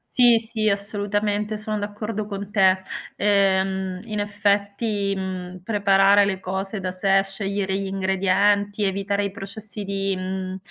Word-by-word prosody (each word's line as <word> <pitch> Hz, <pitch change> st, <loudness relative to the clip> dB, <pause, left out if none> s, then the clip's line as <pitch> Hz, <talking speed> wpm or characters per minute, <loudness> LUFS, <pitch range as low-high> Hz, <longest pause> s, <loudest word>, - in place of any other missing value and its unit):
Sì, 240 Hz, -2 st, +6 dB
sì, 220 Hz, -1 st, -1 dB
assolutamente, 205 Hz, +1 st, -1 dB
sono 215 Hz, 0 st, -3 dB
d'accordo 210 Hz, +1 st, -4 dB
con 200 Hz, -1 st, -6 dB
te. 190 Hz, -3 st, +4 dB, 0.4 s
Ehm, 190 Hz, -2 st, +1 dB
in 215 Hz, -2 st, -4 dB
effetti, 205 Hz, 0 st, 0 dB
mhmm, 185 Hz, -1 st, -5 dB
preparare 200 Hz, 0 st, +4 dB
le 190 Hz, -2 st, -2 dB
cose 190 Hz, +2 st, -4 dB
da 185 Hz, -1 st, -2 dB
sé, 195 Hz, +1 st, +3 dB
scegliere 195 Hz, 0 st, -2 dB
gli 195 Hz, -, -3 dB
ingredienti, 195 Hz, +2 st, +1 dB
evitare 200 Hz, +1 st, 0 dB
i -, -, -3 dB
processi 205 Hz, +2 st, -8 dB
di, 195 Hz, 0 st, -1 dB
mhmm, 185 Hz, 0 st, -4 dB
200 Hz, 135 wpm, -23 LUFS, 190-205 Hz, 0.4 s, Sì